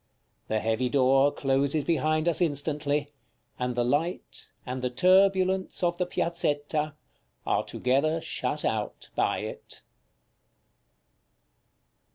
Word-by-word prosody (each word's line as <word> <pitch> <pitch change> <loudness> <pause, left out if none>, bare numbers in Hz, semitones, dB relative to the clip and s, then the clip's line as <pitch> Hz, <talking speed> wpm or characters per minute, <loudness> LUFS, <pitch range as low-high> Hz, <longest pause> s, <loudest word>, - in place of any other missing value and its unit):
The 110 - 0
heavy 115 +3 0
door 135 +1 +4
closes 140 +2 0
behind 155 0 +1
us 170 +1 +2
instantly, 145 -2 0 0.5
and 125 -1 -1
the 120 - +1
light, 140 - -2
and 130 +1 -4
the 125 - 0
turbulence 190 +6 +3
of 175 0 +1
the 180 - 0
Piazzetta, 155 -3 -1 0.5
are - - +1
together 140 +6 0
shut 150 -1 -3
out 110 -1 -3
by - - +1
it. - - -8
145 Hz, 110 wpm, -27 LUFS, 130-170 Hz, 0.5 s, door